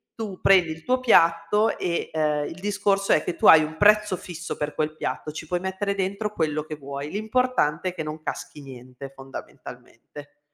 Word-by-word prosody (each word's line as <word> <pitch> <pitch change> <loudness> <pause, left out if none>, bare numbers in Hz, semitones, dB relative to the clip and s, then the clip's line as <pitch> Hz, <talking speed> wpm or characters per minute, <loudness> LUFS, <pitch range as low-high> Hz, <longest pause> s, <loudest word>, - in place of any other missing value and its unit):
tu 210 -5 -6
prendi 180 -4 +5
il 160 0 -9
tuo 255 +5 +1
piatto 170 -2 +3
e, 170 -2 -2
ehm, 150 -2 0
il 165 - -8
discorso 200 0 0
è 155 - +2
che 175 - -3
tu - - -3
hai 160 -1 +9
un 155 +1 -6
prezzo 210 0 +4
fisso 175 -1 -7
per 150 0 -3
quel 155 0 -2
piatto, 155 0 -4
ci 160 - -8
puoi 175 +3 -2
mettere 190 +2 -2
dentro 200 +2 -3
quello 155 -4 -1
che 155 0 -7
vuoi, 140 +1 -7
l'importante 215 -6 0
è - - -8
che 175 - -6
non 155 0 -6
caschi 150 - -6
niente, 130 0 -11
fondamentalmente. 135 +1 -12
165 Hz, 190 wpm, -24 LUFS, 150-200 Hz, -, hai